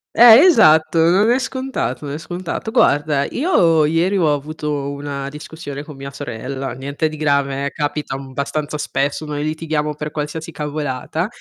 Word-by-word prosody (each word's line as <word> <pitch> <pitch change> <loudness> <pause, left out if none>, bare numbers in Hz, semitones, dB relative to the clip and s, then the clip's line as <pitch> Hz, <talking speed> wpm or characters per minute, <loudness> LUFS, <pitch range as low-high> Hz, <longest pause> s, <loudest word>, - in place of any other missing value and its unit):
Eh, 235 0 +9
esatto, 160 - +5
non 200 +5 +4
è 245 - +4
scontato, 265 - -3
non 140 +1 -4
è - - -4
scontato. 175 +6 -5
Guarda, 145 -5 +2
io 170 - +2
ieri 170 +6 +1
ho 155 -5 +3
avuto 145 -1 -3
una 140 -1 -5
discussione 150 -1 -8
con 150 -1 -11
mia 135 0 -7
sorella, 135 0 -5
niente 140 +4 -2
di 155 0 -7
grave, 140 -2 0
eh, 140 - -2
capita, 145 -2 -3
mhmm, 135 -1 -9
abbastanza 145 +3 -3
spesso, 145 +2 -2
noi 150 -1 -3
litighiamo 155 -1 -2
per 150 +1 -5
qualsiasi 155 +2 -5
cavolata. 150 +2 -3
150 Hz, 165 wpm, -19 LUFS, 140-160 Hz, -, Eh